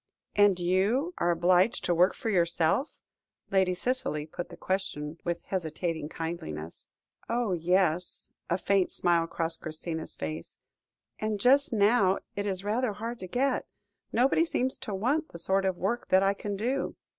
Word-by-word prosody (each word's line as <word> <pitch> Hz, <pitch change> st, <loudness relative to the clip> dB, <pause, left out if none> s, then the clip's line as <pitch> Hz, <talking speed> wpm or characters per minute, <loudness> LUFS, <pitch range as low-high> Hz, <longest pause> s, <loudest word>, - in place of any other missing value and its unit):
"And 205 Hz, -3 st, +5 dB
you 200 Hz, -, +1 dB
are 175 Hz, -, +2 dB
obliged 180 Hz, +5 st, +3 dB
to 175 Hz, -, +2 dB
work 180 Hz, +3 st, +4 dB
for 230 Hz, -5 st, -2 dB
yourself?" 170 Hz, -, +1 dB, 0.5 s
Lady 190 Hz, -2 st, +3 dB
Cicely 180 Hz, -9 st, -1 dB
put 175 Hz, +2 st, -6 dB
the -, -, -11 dB
question 165 Hz, -5 st, -3 dB
with 170 Hz, -1 st, -2 dB
hesitating 165 Hz, -3 st, -3 dB
kindliness. 85 Hz, -, -6 dB, 0.4 s
"Oh, 235 Hz, -3 st, 0 dB
yes" 180 Hz, 0 st, +1 dB, 0.2 s
a 175 Hz, -, +2 dB
faint 195 Hz, -1 st, +2 dB
smile 170 Hz, -2 st, +2 dB
crossed 165 Hz, 0 st, -3 dB
Christina's 160 Hz, 0 st, -5 dB
face 80 Hz, +1 st, -6 dB, 0.6 s
"and 215 Hz, -1 st, -1 dB
just 275 Hz, +6 st, +4 dB
now 205 Hz, -3 st, +4 dB, 0.2 s
it 205 Hz, 0 st, -2 dB
is 190 Hz, -1 st, -2 dB
rather 220 Hz, +2 st, 0 dB
hard 230 Hz, +3 st, -5 dB
to 185 Hz, -, -6 dB
get. 265 Hz, +8 st, 0 dB, 0.4 s
Nobody 260 Hz, +7 st, +3 dB
seems 260 Hz, -5 st, -1 dB
to 205 Hz, -, -4 dB
want 280 Hz, +11 st, 0 dB
the -, -, -9 dB
sort 190 Hz, +3 st, +1 dB
of 190 Hz, -2 st, 0 dB
work 220 Hz, +7 st, -1 dB
that 190 Hz, +1 st, +4 dB
I 195 Hz, 0 st, +3 dB
can 205 Hz, 0 st, -4 dB
do. 250 Hz, +7 st, -1 dB
190 Hz, 155 wpm, -29 LUFS, 170-220 Hz, 0.6 s, And